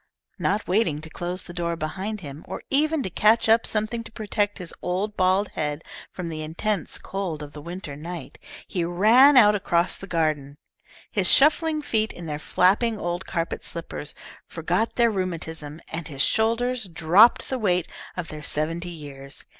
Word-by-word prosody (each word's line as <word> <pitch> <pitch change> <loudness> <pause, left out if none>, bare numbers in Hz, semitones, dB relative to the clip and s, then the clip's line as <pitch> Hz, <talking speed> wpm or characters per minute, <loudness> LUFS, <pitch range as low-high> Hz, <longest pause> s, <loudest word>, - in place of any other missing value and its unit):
Not 205 +1 0
waiting 180 -6 +2
to 160 0 -10
close 175 +3 -4
the 175 - -10
door 170 -1 -2
behind 190 +7 -4
him, 145 -1 -8
or - - -6
even 300 +1 +3
to - - -2
catch 215 +6 +4
up 225 +1 +4
something 215 +2 -1
to 225 - -12
protect 205 -1 -1
his 180 -3 -7
old 195 +4 -2
bald 185 +2 +2
head 150 0 -3 0.3
from 180 -2 -5
the 155 -1 -5
intense 170 +4 -2
cold 180 -6 -4
of 145 -1 -10
the 150 - -9
winter 170 -2 -7
night, 155 -2 -8 0.3
he 175 - -2
ran 225 +11 +6
out 210 -4 +8
across 175 -3 +1
the 195 - -9
garden. 155 -5 -1 0.5
His - - +1
shuffling 305 +1 +4
feet, 220 -5 +1
in 175 - -9
their 150 -2 -4
flapping 205 +8 +2
old 175 -1 -3
carpet 170 -2 -3
slippers, 165 -3 -6 0.3
forgot 175 +7 -1
their 235 -1 +4
rheumatism, 160 -5 -4
and 165 -1 -5
his 140 -3 +1
shoulders 230 +1 +1
dropped 175 +7 +5
the 260 - -1
weight 180 -5 +1 0.3
of 175 -3 -4
their 155 -1 -7
seventy 165 +4 -2
years. 140 -4 -9
180 Hz, 170 wpm, -25 LUFS, 160-215 Hz, 0.5 s, out